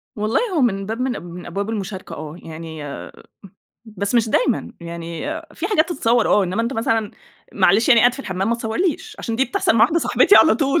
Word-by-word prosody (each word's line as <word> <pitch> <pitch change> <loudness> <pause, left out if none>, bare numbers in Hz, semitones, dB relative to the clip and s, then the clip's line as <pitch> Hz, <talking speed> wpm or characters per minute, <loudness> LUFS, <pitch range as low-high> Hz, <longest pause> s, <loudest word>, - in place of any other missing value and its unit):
والله 215 +1 0 0.2
هو 310 - +2
من 195 -6 +1
باب 225 +3 -4
من 260 0 0
من 175 +1 -9
أبواب 200 +4 -4
المشاركة 200 -3 -5
آه. 155 0 -8
يعني 160 -1 -8 1.0
بس 215 -1 -4
مش 230 -2 +3
دايمًا. - - 0
يعني 170 0 -7 0.3
في 340 - -3
حاجات 355 -6 +2
تتصوّر 235 -5 +2
آه، 205 - +4
إنّما 185 +5 -1
أنت 235 +3 -2
مثلًا 225 -3 0 0.4
معلش 200 +4 +3
يعني 235 -3 +7
قاعد 245 +2 +5
في 275 - -7
الحمام 190 -4 -3
ما 235 - +2
تصوّرليش، 325 - -2
عشان 230 - -3
دي 265 - +3
بتحصل 240 - 0
مع - - +3
واحدة 320 +8 +1
صاحبتي 400 - +4
على 320 - +6
طول. 285 +2 +1
225 Hz, 200 wpm, -20 LUFS, 190-250 Hz, 1.0 s, يعني